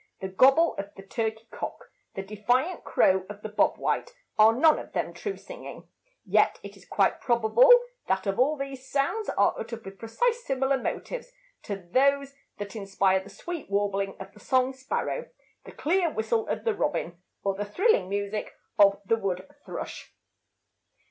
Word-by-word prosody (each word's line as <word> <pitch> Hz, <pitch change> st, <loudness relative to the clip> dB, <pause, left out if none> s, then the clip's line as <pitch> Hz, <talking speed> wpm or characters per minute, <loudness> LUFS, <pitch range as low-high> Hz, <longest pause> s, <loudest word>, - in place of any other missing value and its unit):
The 190 Hz, -, -4 dB
gobble 270 Hz, -, +5 dB
of 200 Hz, 0 st, -4 dB
the 195 Hz, -, -11 dB
turkey 220 Hz, +2 st, -3 dB
cock, -, -, -7 dB, 0.2 s
the 195 Hz, -, -3 dB
defiant 245 Hz, -, 0 dB
crow 190 Hz, 0 st, +3 dB
of 210 Hz, 0 st, -9 dB
the 215 Hz, -, -4 dB
"bob 210 Hz, -1 st, +2 dB
white," -, -, -1 dB, 0.2 s
are 215 Hz, +1 st, +7 dB
none 300 Hz, +7 st, +4 dB
of -, -, -10 dB
them -, -, -2 dB
true 410 Hz, -2 st, -5 dB
singing; -, -, -10 dB, 0.4 s
yet -, -, +3 dB
it -, -, -9 dB
is -, -, -18 dB
quite -, -, +1 dB
probable 240 Hz, -, +5 dB, 0.4 s
that 190 Hz, -, 0 dB
all 250 Hz, +9 st, +2 dB
of 305 Hz, -, -8 dB
these 270 Hz, -1 st, -7 dB
sounds 290 Hz, +11 st, 0 dB
are -, -, +3 dB
uttered 230 Hz, -2 st, -6 dB
with 195 Hz, 0 st, -10 dB
precisely 450 Hz, -, +1 dB
similar 270 Hz, -, 0 dB
motives -, -, -4 dB, 0.3 s
to 200 Hz, -, -4 dB
those 275 Hz, +6 st, +2 dB, 0.2 s
that 205 Hz, +1 st, -6 dB
inspire 195 Hz, -2 st, +1 dB
the 190 Hz, +1 st, -12 dB
sweet 345 Hz, -, -7 dB
warbling 200 Hz, -1 st, 0 dB
of -, -, -9 dB
the 210 Hz, -, -16 dB
song 255 Hz, +3 st, +1 dB
sparrow, 265 Hz, -, -3 dB, 0.4 s
the -, -, -10 dB
clear 345 Hz, +2 st, +1 dB
whistle 220 Hz, -3 st, -1 dB
of -, -, -2 dB
the 455 Hz, -, +1 dB
robin, 230 Hz, -, -2 dB, 0.2 s
or 195 Hz, -, +1 dB
the 200 Hz, +2 st, -3 dB
thrilling 355 Hz, -, +2 dB
music 200 Hz, +1 st, -3 dB, 0.2 s
of 200 Hz, -1 st, +6 dB
the 225 Hz, +4 st, +2 dB
wood 190 Hz, -3 st, -3 dB, 0.2 s
thrush. -, -, -7 dB
225 Hz, 170 wpm, -27 LUFS, 200-280 Hz, 0.4 s, are